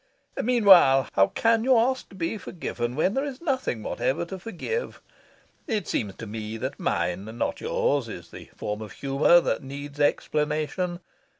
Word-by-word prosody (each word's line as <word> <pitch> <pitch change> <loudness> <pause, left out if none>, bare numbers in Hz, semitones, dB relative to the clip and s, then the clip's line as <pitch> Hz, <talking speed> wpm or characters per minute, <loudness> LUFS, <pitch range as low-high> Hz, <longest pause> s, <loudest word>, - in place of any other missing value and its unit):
Meanwhile, 190 - +6
how 95 0 +5
can 225 - +2
you 255 0 +5
ask 260 +3 +1
to - - -14
be 190 +4 -2
forgiven 125 -10 -4
when 170 +6 +1
there 270 - 0
is 280 -3 -5
nothing 260 - -2
whatever 135 +8 -1
to 190 +2 -7
forgive? 230 - -4 0.7
It 210 -7 -1
seems 100 -3 -2
to 115 - -8
me 110 +1 -5
that 130 +4 -5
mine, 90 +2 -1
not - - -2
yours, 140 -5 0
is 85 -6 -9
the - - -10
form 105 +1 -4
of 105 -2 -8
humour 140 +5 +4
that - - -1
needs 140 +1 -8
explanation. 155 +4 0
150 Hz, 165 wpm, -26 LUFS, -, 0.7 s, Meanwhile